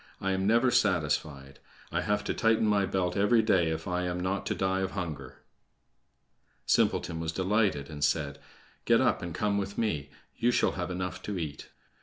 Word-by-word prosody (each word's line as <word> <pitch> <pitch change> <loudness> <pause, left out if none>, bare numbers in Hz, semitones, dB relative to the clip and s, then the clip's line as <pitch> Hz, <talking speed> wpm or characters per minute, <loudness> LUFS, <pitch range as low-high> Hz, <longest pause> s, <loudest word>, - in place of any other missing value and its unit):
I 95 - -1
am 95 +1 0
never 120 +3 +4
satisfied. 75 - 0 0.3
I - - 0
have 105 0 0
to - - -2
tighten 115 -1 +2
my 100 -2 +2
belt 90 -2 -1
every 110 +3 +4
day 95 -6 +3
if 80 0 -4
I 90 0 -1
am 90 0 -2
not 95 +2 -2
to - - -1
die 95 0 0
of 95 0 -2
hunger." 75 -9 -6 1.2
Simpleton 80 -1 +1
was 80 -1 -2
delighted, 95 -5 +1
and 75 -2 -6
said: 75 -1 0 0.5
"Get - - +5
up - - +2
and 85 - -5
come 100 +4 0
with 100 0 -5
me. 75 -12 -1 0.3
You 120 - +1
shall 120 - +2
have 90 -1 -4
enough 90 0 -4
to 105 -2 -4
eat." 75 -3 -5
95 Hz, 185 wpm, -29 LUFS, 80-100 Hz, 1.2 s, Get